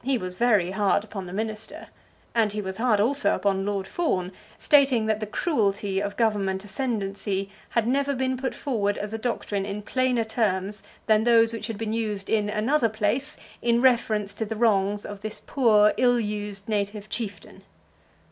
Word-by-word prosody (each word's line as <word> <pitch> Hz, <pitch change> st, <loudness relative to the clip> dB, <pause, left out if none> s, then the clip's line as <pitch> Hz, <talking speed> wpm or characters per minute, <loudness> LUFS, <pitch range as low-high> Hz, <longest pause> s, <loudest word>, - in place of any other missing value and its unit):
He 265 Hz, +1 st, +1 dB
was 185 Hz, -4 st, -5 dB
very 210 Hz, -5 st, +2 dB
hard 200 Hz, 0 st, +1 dB
upon 205 Hz, -3 st, -7 dB
the -, -, -8 dB
minister, 215 Hz, +2 st, -5 dB, 0.4 s
and 220 Hz, -3 st, +2 dB
he 210 Hz, -, -3 dB
was 190 Hz, -2 st, -4 dB
hard 225 Hz, -3 st, +2 dB
also 275 Hz, +7 st, +3 dB
upon 195 Hz, -1 st, 0 dB
Lord 200 Hz, -2 st, -1 dB
Fawn, 190 Hz, -, -1 dB, 0.3 s
stating 275 Hz, -6 st, +4 dB
that 215 Hz, -1 st, 0 dB
the 215 Hz, -, -4 dB
cruelty 205 Hz, -, 0 dB
of 205 Hz, 0 st, -4 dB
Government 200 Hz, -4 st, 0 dB
ascendancy 200 Hz, -3 st, -2 dB, 0.2 s
had 235 Hz, -1 st, 0 dB
never 280 Hz, +2 st, +1 dB
been 260 Hz, 0 st, 0 dB
put 260 Hz, +1 st, -3 dB
forward 205 Hz, -7 st, -1 dB
as 210 Hz, +1 st, -4 dB
a 225 Hz, -, -3 dB
doctrine 215 Hz, -4 st, -2 dB
in 205 Hz, +1 st, -5 dB
plainer 255 Hz, 0 st, +1 dB
terms 210 Hz, -3 st, -1 dB, 0.2 s
than 215 Hz, 0 st, +4 dB
those 230 Hz, -1 st, +4 dB
which 220 Hz, -1 st, -4 dB
had 225 Hz, -3 st, -5 dB
been 220 Hz, 0 st, -3 dB
used 210 Hz, -3 st, -2 dB
in 210 Hz, -2 st, +2 dB
"another 230 Hz, +4 st, +1 dB
place" 225 Hz, +8 st, -1 dB, 0.2 s
in 235 Hz, 0 st, +2 dB
reference 225 Hz, -5 st, +2 dB
to 220 Hz, -, -3 dB
the 220 Hz, +1 st, -4 dB
wrongs 205 Hz, -2 st, +1 dB
of 205 Hz, -1 st, -8 dB
this 215 Hz, 0 st, -6 dB
poor 215 Hz, -6 st, +4 dB
ill 245 Hz, -1 st, +4 dB
used 205 Hz, -2 st, -4 dB
native 205 Hz, -1 st, -2 dB
chieftain. 215 Hz, -2 st, -5 dB
215 Hz, 175 wpm, -25 LUFS, 200-235 Hz, 0.4 s, stating